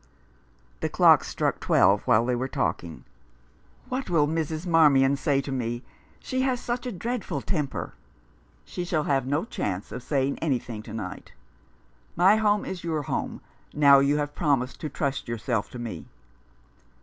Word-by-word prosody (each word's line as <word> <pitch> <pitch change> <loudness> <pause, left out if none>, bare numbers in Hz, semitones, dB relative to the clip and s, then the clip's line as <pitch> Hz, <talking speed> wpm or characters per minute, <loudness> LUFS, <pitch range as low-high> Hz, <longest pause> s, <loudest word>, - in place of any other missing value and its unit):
The - - -2
clocks - - +5
struck - - -1
twelve 100 +2 +4
while 115 +2 +4
they 125 0 +1
were 130 +2 -2
talking. 85 -10 -3 0.4
" - - -30
What 255 -4 -3
will 155 -4 +3
Mrs. 160 +1 -2
Marmian 145 -5 +5
say 140 0 +1
to 135 - -6
me? 120 -1 -3 0.4
She 260 0 -2
has 260 -2 +1
such 245 +1 -3
a - - -3
dreadful 235 +3 -3
temper! 150 -7 -3 0.2
" - - -34
" - - -34
She 180 - -5
shall 170 -3 0
have 135 -3 0
no 145 +7 0
chance 100 - -4
of - - -6
saying 140 +1 -1
anything 125 -7 -2
to 110 0 -10
night. 100 -3 -7 0.8
My 190 +5 +5
home 210 -1 +2
is 185 -2 -6
your 160 -3 -2
home - - -3 0.3
now 140 -2 +7
you 140 +2 +2
have 145 0 -2
promised 140 -6 0
to 155 - -3
trust 140 0 -3
yourself 115 -1 -2
to - - -9
me." 115 -9 -6
140 Hz, 170 wpm, -26 LUFS, 120-170 Hz, 0.8 s, now